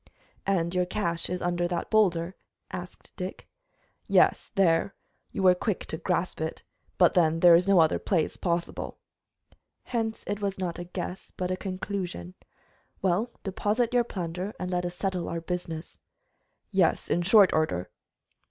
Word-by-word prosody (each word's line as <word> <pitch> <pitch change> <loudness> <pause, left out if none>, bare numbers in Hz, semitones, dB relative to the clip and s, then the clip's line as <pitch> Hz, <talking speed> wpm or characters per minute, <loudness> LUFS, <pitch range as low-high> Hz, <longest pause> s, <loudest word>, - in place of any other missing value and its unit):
"And 175 -3 +1
your 180 -1 +1
cache 170 -4 -1
is 180 0 -3
under 175 0 +1
that 175 0 -3
boulder?" 185 -5 +3 0.4
asked 180 -1 -8
Dick. 185 +1 -6 0.6
"Yes, - - +3
there. 190 0 +3 0.4
You - - -3
were 185 -1 +7
quick 190 +2 -2
to 160 - -4
guess 180 0 0
it 160 0 -3 0.3
But, 175 - +5
then, 165 -2 +3
there 175 -1 +9
is 175 +3 +5
no 195 -2 +6
other 160 -1 +4
place 170 -6 0
possible." 170 -1 -2 0.9
"Hence 225 -2 -2
it 205 +1 -3
was 195 -1 -1
not 180 -3 -3
a 175 - -5
guess, 180 +1 -6
but 180 0 -3
a - - +1
conclusion. 185 - -4 0.7
Well, 195 +6 +2
deposit 215 +5 0
your 245 -1 +4
plunder 180 -1 -4
and 180 0 -3
let 180 0 0
us 175 - -7
settle 185 -2 -2
our 170 - -2
business." 165 -1 -5 0.7
"Yes, 190 -5 +2
in 175 - +1
short 190 +1 +6
order." 125 - 0
180 Hz, 155 wpm, -28 LUFS, 170-195 Hz, 0.9 s, there